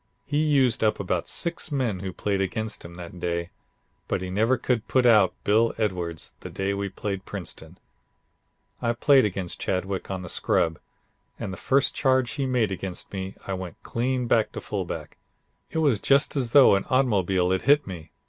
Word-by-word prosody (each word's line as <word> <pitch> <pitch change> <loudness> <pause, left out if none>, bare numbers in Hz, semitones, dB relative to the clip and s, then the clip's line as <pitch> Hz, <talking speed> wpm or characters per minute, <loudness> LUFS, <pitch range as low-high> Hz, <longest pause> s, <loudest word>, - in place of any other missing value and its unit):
He 145 +2 0
used 135 -7 +2
up 110 - +2
about 90 -3 -1
six 170 -2 -3
men 125 -9 0
who 95 0 -4
played 100 +1 -1
against 110 +3 -3
him 85 0 -10
that 90 0 -9
day, 85 0 -2 0.6
but - - -1
he 90 - -5
never 110 +7 +2
could 120 -4 -1
put 130 -1 +2
out 105 -6 +5
Bill 110 +3 +3
Edwards 90 -6 -2
the - - -8
day 95 +1 -2
we 100 0 -2
played 95 0 -4
Princeton. 90 -3 -7 1.0
I 115 - +1
played 135 +1 +5
against 95 -3 -3
Chadwick 95 +1 -2
on 95 -1 -4
the - - -7
Scrub, 80 -1 +1 0.6
and 95 - -4
the - - -5
first 135 +9 +2
charge 130 -3 +2
he 140 -2 -2
made 120 -6 +1
against 95 0 -5
me 95 0 -5
I 95 - -3
went 90 -2 -7
clean 125 +1 -1
back 115 -2 +2
to - - -4
fullback. - - -5 0.5
It - - -5
was 145 -10 +3
just 140 +5 +2
as 130 -4 0
though 135 -3 +7
an 100 - +1
automobile 95 -8 +2
had 95 - +1
hit 145 +1 +6
me. 85 -5 -8
100 Hz, 185 wpm, -25 LUFS, 95-125 Hz, 1.0 s, though